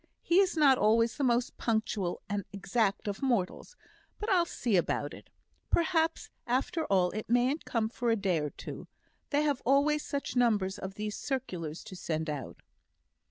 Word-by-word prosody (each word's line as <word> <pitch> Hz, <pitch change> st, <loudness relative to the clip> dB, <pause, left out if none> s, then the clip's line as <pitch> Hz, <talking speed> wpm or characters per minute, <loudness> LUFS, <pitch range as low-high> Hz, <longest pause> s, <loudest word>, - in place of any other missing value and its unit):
He 345 Hz, +2 st, +4 dB
is 380 Hz, -4 st, +2 dB
not 275 Hz, -4 st, +6 dB
always 230 Hz, +2 st, +3 dB
the 285 Hz, -, -2 dB
most 240 Hz, -1 st, +1 dB
punctual 215 Hz, -5 st, -1 dB
and 205 Hz, -1 st, -2 dB
exact 200 Hz, +1 st, 0 dB
of 200 Hz, -1 st, -3 dB
mortals; 245 Hz, -, -1 dB, 0.4 s
but 425 Hz, +1 st, -2 dB
I'll 350 Hz, -3 st, +4 dB
see 235 Hz, -9 st, -1 dB
about 175 Hz, -, 0 dB
it. -, -, -13 dB, 0.4 s
Perhaps 330 Hz, -1 st, +1 dB, 0.2 s
after 275 Hz, +7 st, 0 dB
all 180 Hz, -2 st, +2 dB
it 215 Hz, +3 st, -5 dB
mayn't 250 Hz, +6 st, +2 dB
come 225 Hz, -2 st, 0 dB
for 240 Hz, +1 st, -2 dB
a 225 Hz, -, +4 dB
day 190 Hz, -6 st, +1 dB
or 150 Hz, -1 st, -2 dB
two; -, -, -8 dB, 0.4 s
they 290 Hz, 0 st, +2 dB
have 285 Hz, -3 st, 0 dB
always 290 Hz, +3 st, +3 dB
such 280 Hz, -2 st, -4 dB
numbers 210 Hz, -6 st, +2 dB
of 190 Hz, +1 st, -6 dB
these 210 Hz, 0 st, -4 dB
circulars 180 Hz, -, -4 dB
to 215 Hz, -3 st, -9 dB
send 160 Hz, -3 st, -2 dB
out." 140 Hz, -4 st, -7 dB
230 Hz, 170 wpm, -30 LUFS, 195-280 Hz, 0.4 s, not